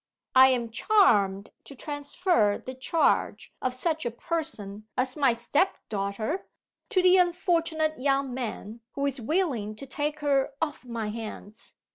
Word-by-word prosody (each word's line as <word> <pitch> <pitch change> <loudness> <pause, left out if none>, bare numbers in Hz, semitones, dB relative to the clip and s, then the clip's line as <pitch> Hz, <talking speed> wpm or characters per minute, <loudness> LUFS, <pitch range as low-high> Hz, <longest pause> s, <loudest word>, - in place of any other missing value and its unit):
I 260 0 +8
am 240 -3 0
charmed 210 - +3
to 280 - -11
transfer 290 - 0
the 260 - -8
charge 260 +5 0
of 255 -1 -1
such 315 +4 -1
a 240 - -1
person 225 -7 -4
as 255 0 0
my 275 -4 +4
step 265 +10 +1
daughter 210 - -3 0.4
to 375 -5 +2
the 370 0 +6
unfortunate 335 -4 +1
young 275 -1 +1
man 230 -3 -5
who 280 0 -2
is 275 -2 -2
willing 240 - -1
to 275 - -9
take 295 +3 -3
her 280 -1 +1
off 295 -5 -3
my 230 -3 -4
hands. 215 -1 -8
265 Hz, 145 wpm, -27 LUFS, 225-315 Hz, 0.4 s, I